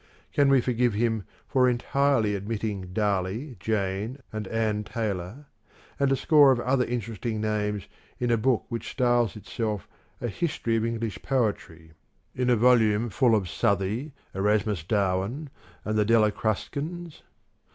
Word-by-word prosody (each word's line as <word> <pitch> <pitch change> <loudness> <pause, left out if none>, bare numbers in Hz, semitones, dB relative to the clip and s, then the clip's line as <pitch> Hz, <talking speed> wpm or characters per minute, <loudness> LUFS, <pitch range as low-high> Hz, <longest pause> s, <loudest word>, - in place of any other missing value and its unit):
Can 140 -1 +4
we 135 -2 +5
forgive 120 -2 +1
him 110 -2 0 0.2
for 125 -1 +3
entirely 125 -3 +1
omitting 100 -2 -4
Darley, 105 +6 -1
Jane 105 +3 -2 0.2
and 110 -2 -4
Ann 110 -1 0
Taylor, 105 +4 -4 0.5
and 140 -1 +2
a - - +4
score 145 -1 +6
of 125 - +2
other 125 +1 +2
interesting 115 -2 -3
names 105 -2 -1 0.3
in 120 -1 0
a - - +5
book 120 +1 +1
which 115 -2 -4
styles 120 -3 +1
itself 105 -1 -4 0.3
a - - -2
History 115 - -1
of 115 0 +1
English 115 -2 -3
Poetry, 100 - -2 0.4
in 125 0 0
a 125 - +5
volume 115 -2 +3
full 120 -2 +3
of 100 -4 0
Southey, 100 - 0 0.2
Erasmus 105 -2 +1
Darwin, 100 - -1 0.3
and 110 0 0
the - - +4
Delia 110 -1 +4
Crus 110 -1 -1
cans? 165 +3 -6
115 Hz, 145 wpm, -26 LUFS, 105-125 Hz, 0.5 s, score